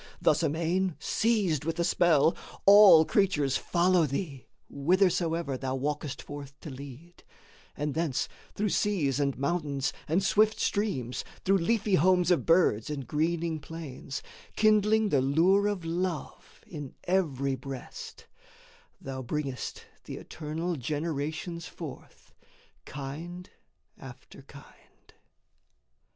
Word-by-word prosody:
Thus - - +3
amain, 170 +3 0
Seized 205 - +1
with 165 +1 -2
the 170 - 0
spell, 170 -3 +3 0.3
all 200 -5 +9
creatures 150 -11 +1
follow 175 -1 +2
thee 140 -1 -5 0.2
Whithersoever 165 -2 +1
thou 130 -1 -2
walkest 145 +1 -3
forth 140 -1 -9
to 155 - -7
lead, 140 +6 -11 0.5
And 150 -1 -2
thence 160 -5 -1 0.3
through 210 +1 0
seas 165 -11 +1
and 140 -2 0
mountains 140 -2 -1
and 170 +5 +1
swift 215 +2 +3
streams, 175 - -1 0.2
Through 195 +1 +4
leafy 210 +3 0
homes 180 +1 +4
of 175 - +2
birds 165 - +3
and 140 -3 -4
greening 160 +3 -1
plains, 145 -3 -7 0.3
Kindling 215 0 +3
the 140 -6 +3
lure 175 +9 +3
of 200 -5 -2
love 170 0 -4
in 145 -5 -8
every 140 -8 0
breast, 130 0 -8 0.7
Thou 130 -1 -6
bringest 135 0 -4 0.2
the - - -6
eternal 160 +2 -4
generations 155 +4 -3
forth, 155 -6 -10 0.5
Kind 165 +7 -7 0.5
after - - -12
kind. - - -18
160 Hz, 115 wpm, -29 LUFS, 140-185 Hz, 0.7 s, all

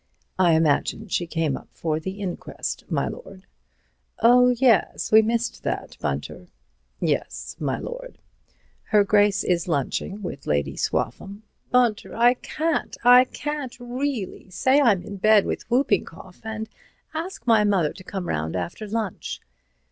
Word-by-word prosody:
"I 175 -3 +5
imagine 160 +7 +1
she 175 -1 -1
came 160 -4 -1
up - - -10
for 155 -2 -2
the 190 +5 -6
inquest, 185 -3 -5
my - - 0
lord." 195 - -9 0.7
"Oh, 250 +2 +6
yes—we 230 -3 +4
missed 230 +1 -1
that, - - -4
Bunter." 70 +5 -4 0.5
"Yes, - - -2
my 140 -4 -1
lord. - - -7 0.7
Her 210 -1 +4
Grace 205 0 +3
is 175 -1 0
lunching 170 +6 -2
with 140 -6 -6
Lady 70 -1 0
Swaffham." 200 +2 -3 0.3
"Bunter, 240 -4 +1
I 240 +2 +5
can't. 315 +5 -2
I 250 +1 +8
can't, 290 -1 -5
really. 245 -5 -4
Say 260 +9 +3
I'm 210 -9 +3
in 200 - -7
bed 215 +1 +5
with - - -4
whooping 245 -5 +2
cough, 180 +2 -14
and 220 0 -5 0.5
ask 335 +4 -5
my 225 -3 +5
mother 190 -7 +2
to 185 - -12
come 185 -1 -5
round 80 +2 -2
after 90 - -4
lunch." 215 -3 -3
210 Hz, 140 wpm, -24 LUFS, 175-245 Hz, 0.7 s, I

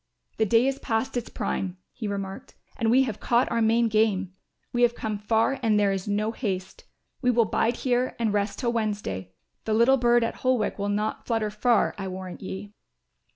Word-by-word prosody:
"The 220 - +2
day 230 +4 +4
is 270 0 0
past 225 +1 -1
its 240 -2 -3
prime," 185 -1 -3 0.2
he 220 - -5
remarked, 195 -1 -5 0.2
"and 225 - 0
we 260 +3 +5
have 225 -6 -4
caught 240 +1 +2
our 230 0 +1
main 230 +1 +3
game. 210 -4 +1 0.4
We 240 - +1
have 240 -1 +4
come 215 -3 -3
far 225 +5 +1
and 220 -3 +3
there 200 -1 +3
is 195 0 -3
no 210 +2 0
haste. 190 -6 -4 0.4
We 250 - +2
will 235 -2 +4
bide 230 +3 +1
here 250 0 0
and 225 -3 0
rest 205 0 0
till 240 -3 -1
Wednesday; 205 - -2 0.3
the 215 - +1
little 240 +4 +5
bird 240 -1 +4
at 230 - -2
Holwick 255 -5 0
will 200 +1 -1
not 210 +1 -2
flutter 225 -3 0
far, 230 +2 +2
I 195 - -3
warrant 185 -1 -7
ye." 200 +1 -7
220 Hz, 200 wpm, -26 LUFS, 205-235 Hz, 0.4 s, we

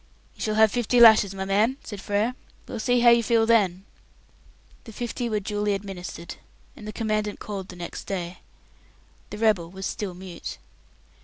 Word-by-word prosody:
"You - - -15
shall 215 -1 -1
have 220 -1 +5
fifty 245 +1 +1
lashes, 220 -4 +7
my 190 0 -3
man," 215 +7 +2
said 205 -4 -8
Frere. 210 +5 0 0.3
"We'll 235 - -5
see 245 +2 +2
how 240 0 +7
you 235 0 +5
feel 230 -1 +2
then!" 195 -5 +2 1.0
The 225 - -9
fifty 240 +2 -4
were 215 -1 0
duly 205 0 -1
administered, 185 -3 -7 0.4
and 210 - -10
the - - -4
Commandant 215 -1 -2
called 195 -3 -6
the 180 - -9
next 175 -1 -7
day. 180 -2 -4 0.9
The - - -7
rebel 210 -7 +2
was 190 +1 -7
still 195 -4 -4
mute. 180 -2 -8
210 Hz, 170 wpm, -25 LUFS, 190-225 Hz, 1.0 s, lashes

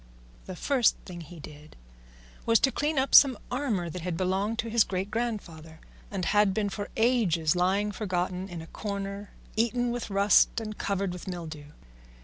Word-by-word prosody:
The 185 - -6
first 255 - +2
thing 175 -2 -8
he 165 +1 -11
did 150 +1 -12 0.7
was 230 -2 +5
to 270 - +4
clean 295 +2 -1
up 265 +1 0
some 265 -5 +8
armour 245 -10 -1
that 170 +2 -6
had 170 -1 -3
belonged 195 +5 0
to 230 +1 -2
his 230 -1 +5
great 190 +1 -4
grandfather, 175 -9 -4 0.3
and 190 -3 -3
had 205 -1 +3
been 210 -2 0
for 205 +1 -5
ages 205 -10 +2
lying 195 +4 +1
forgotten 185 -2 -3
in 170 -2 -7
a 165 - -15
corner 200 -1 -5 0.3
eaten 235 +2 +1
with 240 -2 -4
rust 200 +3 +4
and 215 -1 -6
covered 195 -3 -2
with 180 +2 -9
mildew. 160 -5 -6
200 Hz, 170 wpm, -28 LUFS, 180-225 Hz, 0.7 s, some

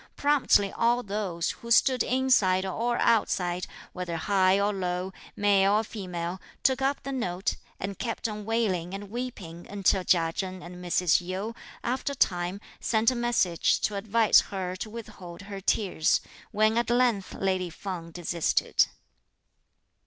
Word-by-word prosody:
Promptly 280 -9 +3
all 240 +1 +1
those, 195 -5 -2
who 235 - -11
stood 255 +1 +4
inside 230 -8 +3
or 235 +5 -1
outside, 180 -6 +1 0.3
whether 180 -2 -4
high 190 +2 +3
or 205 +1 +1
low, 185 0 -3 0.2
male 200 -1 +3
or 215 +1 +3
female, 180 -4 -5 0.2
took 265 -1 +3
up 275 +2 0
the 275 - -4
note, 195 -7 -2 0.2
and 195 0 -5
kept 230 -1 -2
on 210 -1 -5
wailing 200 -5 -1
and 200 0 -8
weeping 210 -9 -6
until 195 -1 +1
Chia 165 -2 +2
Chen 185 0 -4
and 180 +1 -10
Mrs. 180 0 +2
Yu, 190 +5 -4 0.3
after 260 +3 -1
a - - -7
time, 180 -4 0 0.2
sent 225 +1 +2
a - - -3
message 235 -8 +2
to 210 - 0
advise 220 +2 +4
her 185 -2 -4
to 215 - -5
withhold 200 -5 -9
her 200 0 -7
tears; 185 -5 +2 0.3
when 215 +2 +2
at 240 - -1
length 240 -5 +1
lady 185 -2 -1
Feng 170 0 -6
desisted. 170 0 +1
195 Hz, 150 wpm, -27 LUFS, 180-230 Hz, 0.3 s, stood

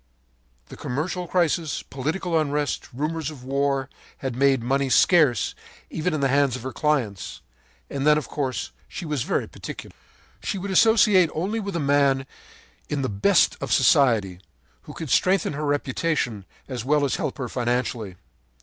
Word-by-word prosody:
“The - - -9
commercial 175 +7 -3
crisis, 165 -3 0
political 160 +6 -3
unrest, 145 -2 -1
rumors 155 +3 -3
of 145 -5 -11
war, 135 0 0 0.3
had 130 -3 -4
made 135 -2 +3
money 135 +2 +1
scarce 130 - +4 0.4
even 165 +3 -1
in 150 - -2
the 135 - +3
hands 140 -1 +2
of 125 - -7
her 130 -1 -5
clients. 130 -10 -1 0.5
And 140 +1 -2
then, 150 0 +6
of 150 - -3
course, 135 -4 -3 0.2
she 175 - -7
was 150 -4 -2
very - - -1
particular. - - -9 0.5
“She - - -3
would 195 +1 -4
associate 205 -4 +5
only 195 +8 -1
with 200 -3 -4
a - - 0
man 140 -2 +2 0.6
in 145 -2 -1
the 130 - -1
best 100 -1 +3
of - - -4
society, 110 -10 +3 0.5
who - - -9
could 160 -5 -6
strengthen 185 -3 +2
her 150 +2 -3
reputation 140 - -1 0.2
as 125 -4 -4
well 145 +2 +2
as 140 - -1
help - - -3
her 130 -3 -3
financially. 120 -5 -2
140 Hz, 160 wpm, -24 LUFS, 130-160 Hz, 0.6 s, then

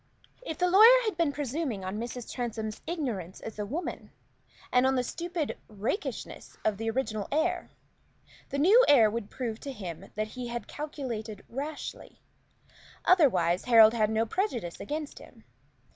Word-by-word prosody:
If 320 -11 -5
the 360 - +2
lawyer 445 +7 +8
had 430 - -1
been 335 -4 +1
presuming 275 - -3
on 190 +3 -3
Mrs. 240 +1 -6
Transome's 220 -3 -4
ignorance 240 - -3
as 220 -1 -8
a 205 - -2
woman, 315 - -5 0.6
and 250 +1 +4
on 265 - +2
the 250 - +1
stupid 335 +3 -4
rakishness 215 - -4
of 215 -2 +1
the 225 +1 -2
original 225 -4 -2
heir, 345 +4 0 0.8
the 280 - -3
new 400 - +6
heir 230 -7 +6
would 220 -2 -4
prove 235 -3 -4
to 280 - -6
him 185 -6 -8
that 215 +1 -2
he 250 +1 -6
had 235 0 -5
calculated 240 -9 -6
rashly. 290 +5 -6 0.9
Otherwise, 235 - +4
Harold 225 -2 +7
had 215 -2 +2
no 220 +1 +1
prejudice 235 - -2
against 300 0 -5
him. - - -16
245 Hz, 155 wpm, -29 LUFS, 215-310 Hz, 0.9 s, lawyer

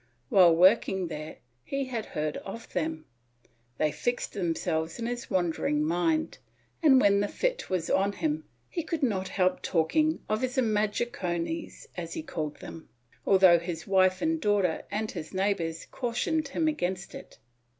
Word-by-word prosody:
While 175 -4 +6
working 190 0 +4
there 155 -1 -6 0.3
he 275 0 -2
had 240 -4 -4
heard 150 0 -1
of 225 +4 -9
them, 160 0 -2 0.7
they 155 -1 +1
fixed 245 - -2
themselves 165 -3 -1
in 230 - -4
his 240 0 -4
wandering 165 -4 0
mind 175 - 0 0.4
and, 280 -5 +6
when 200 -3 +4
the 205 - +1
fit - - -2
was 180 -3 -1
on 200 +1 +2
him, 310 +5 -2 0.2
he 345 - -3
could 325 -1 -3
not 195 -7 0
help 185 -1 +1
talking 305 - +1
of 215 +1 0
his 255 +1 -2
imaginaciones 215 - -1
as - - -5
he 320 - -4
called 155 - -4
them, 165 - -10 0.4
although 185 -3 +7
his 170 -1 -5
wife 185 +1 +3
and 320 0 +1
daughter 200 -5 +1
and 215 +1 -2
his 165 +1 -7
neighbors, 185 -4 -1
cautioned 275 +6 -1
him 315 +3 0
against 190 -11 -2
it. - - -11
195 Hz, 155 wpm, -28 LUFS, 170-250 Hz, 0.7 s, although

